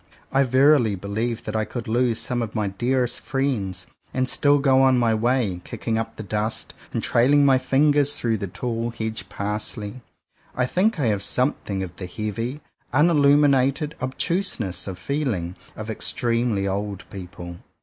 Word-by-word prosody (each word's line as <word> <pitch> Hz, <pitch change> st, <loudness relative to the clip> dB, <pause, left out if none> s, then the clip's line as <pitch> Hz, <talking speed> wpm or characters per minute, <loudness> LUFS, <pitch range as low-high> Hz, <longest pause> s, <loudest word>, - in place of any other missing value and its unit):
I 135 Hz, -, +3 dB
verily 130 Hz, -3 st, +4 dB
believe 110 Hz, +5 st, -3 dB
that 105 Hz, -, -5 dB
I 110 Hz, -, +2 dB
could 115 Hz, +3 st, -6 dB
lose 120 Hz, 0 st, +1 dB
some 120 Hz, +1 st, -2 dB
of 115 Hz, -1 st, -4 dB
my 105 Hz, -3 st, 0 dB
dearest 125 Hz, +5 st, 0 dB
friends, 110 Hz, -10 st, -2 dB
— -, -, -37 dB
and 130 Hz, 0 st, +1 dB
still 145 Hz, +2 st, +3 dB
go 135 Hz, -2 st, +4 dB
on 130 Hz, -1 st, +5 dB
my 115 Hz, -2 st, +3 dB
way, 110 Hz, -5 st, +1 dB
kicking 115 Hz, -1 st, -2 dB
up 115 Hz, -, -4 dB
the 110 Hz, -, -6 dB
dust, 105 Hz, +2 st, -2 dB, 0.2 s
and -, -, -2 dB
trailing 140 Hz, +4 st, +4 dB
my 135 Hz, -2 st, +5 dB
fingers 145 Hz, +2 st, +3 dB
through 115 Hz, -2 st, 0 dB
the 100 Hz, -1 st, -4 dB
tall 115 Hz, +4 st, -3 dB
hedge 110 Hz, -1 st, -4 dB
parsley. 105 Hz, +3 st, -3 dB, 0.5 s
I 125 Hz, -, +2 dB
think 185 Hz, -, +1 dB
I 140 Hz, -, +1 dB
have 105 Hz, -3 st, +1 dB
something 105 Hz, -5 st, 0 dB
of 90 Hz, -2 st, -8 dB
the 90 Hz, -, -5 dB
heavy, 115 Hz, +8 st, -4 dB, 0.3 s
unilluminated 145 Hz, -1 st, +4 dB
obtuseness 130 Hz, -, -1 dB
to 95 Hz, -, -5 dB
feel 140 Hz, +5 st, -1 dB
ing, 85 Hz, 0 st, -5 dB, 0.2 s
of 110 Hz, +1 st, -5 dB
extremely 115 Hz, -4 st, 0 dB
old 100 Hz, -1 st, -3 dB
people. 90 Hz, -2 st, -8 dB
120 Hz, 165 wpm, -23 LUFS, 105-135 Hz, 0.5 s, on